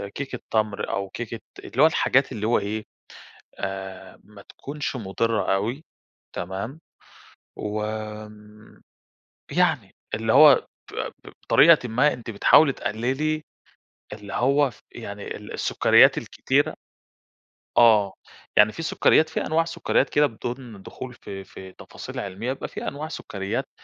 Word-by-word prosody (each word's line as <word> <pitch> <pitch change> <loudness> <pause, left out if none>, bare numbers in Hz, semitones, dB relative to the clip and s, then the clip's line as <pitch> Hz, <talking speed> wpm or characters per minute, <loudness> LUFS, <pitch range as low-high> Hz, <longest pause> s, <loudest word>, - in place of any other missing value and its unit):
كيكة 135 -3 -5
تَمْر 110 -2 0
أو 100 0 -2
كيكة 115 +2 -6 0.2
اللي 130 - -2
هو - - +9
الحاجات 135 -4 +2
اللي 110 -3 -3
هو 120 - +3
إيه، 105 +2 -4 0.7
آآ 95 -1 -6
ما 105 -1 -15
تكونش 140 +4 -6
مضرة 110 -1 0
أوي، 115 +10 -2 0.5
تمام؟ 100 - -5 0.8
و 105 0 -3 1.7
يعني، - - +1 0.2
اللي 110 0 0
هو 145 0 +7 0.3
ب - - -10 0.3
ب - - -10
بطريقةٍ 155 -6 +5
ما 125 +7 +3
أنتِ 120 -2 -7
بتحاولي 135 +7 +5
تقللي 135 +8 -2 0.7
اللي 105 -2 -9
هو 140 +5 +2
ف - - -19
يعني 100 -3 -7
ال 105 - -10
السكريات - - +4
الكتيرة - - 0 1.0
آه، 105 -5 +5 0.4
يعني 105 +1 +6
في 165 - -6
سكريات، 160 -1 +3
في 160 - -3
أنواع 165 +1 +2
سكريات 165 0 0
كده 150 0 +4
بدون 120 -3 -7
دخول 125 +5 -8
في 95 -4 -9
في 95 0 -12
تفاصيل - - -10
علمية، 100 +6 -4
بيبقى 135 - -6
في - - -6
أنواع 150 +2 -5
سكريات 100 -10 -4
115 Hz, 130 wpm, -24 LUFS, 100-135 Hz, 1.7 s, هو